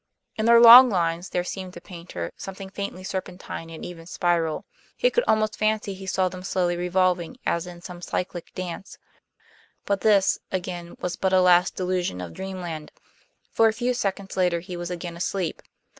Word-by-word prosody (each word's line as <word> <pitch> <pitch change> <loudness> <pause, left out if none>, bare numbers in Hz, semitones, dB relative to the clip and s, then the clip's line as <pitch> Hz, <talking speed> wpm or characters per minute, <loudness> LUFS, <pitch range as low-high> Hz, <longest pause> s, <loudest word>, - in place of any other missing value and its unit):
In 220 +1 -1
their 235 0 +8
long 240 +2 +11
lines 175 -2 -1
there 180 - -1
seemed 185 0 -6
to - - -9
Paynter 170 - -7
something 195 0 -8
faintly 200 -2 -5
serpentine 185 -3 -6
and 165 - -8
even 165 -2 -9
spiral. 170 -3 0 0.3
He - - +3
could 485 - +2
almost 215 0 +2
fancy 215 -1 0
he 190 0 -10
saw 185 0 +1
them 185 0 -7
slowly 180 -2 0
revolving 180 +3 0
as 170 +1 0
in 175 -1 -10
some 180 -2 -9
cyclic 180 -1 -4
dance, 185 +1 -6 0.9
but 200 -2 0
this, 200 -2 +4
again, 175 -2 -5
was 180 -1 -3
but 190 0 0
a 185 - +6
last 180 0 +4
delusion 180 - -1
of 90 -2 -7
dreamland, 180 -5 -6 0.6
for 225 - +4
a 220 - +1
few 245 +2 0
seconds 200 -4 -3
later 180 -2 +2
he 180 +1 -8
was 175 0 -5
again 175 -1 -5
asleep. 180 +1 -3
185 Hz, 175 wpm, -25 LUFS, 175-195 Hz, 0.9 s, long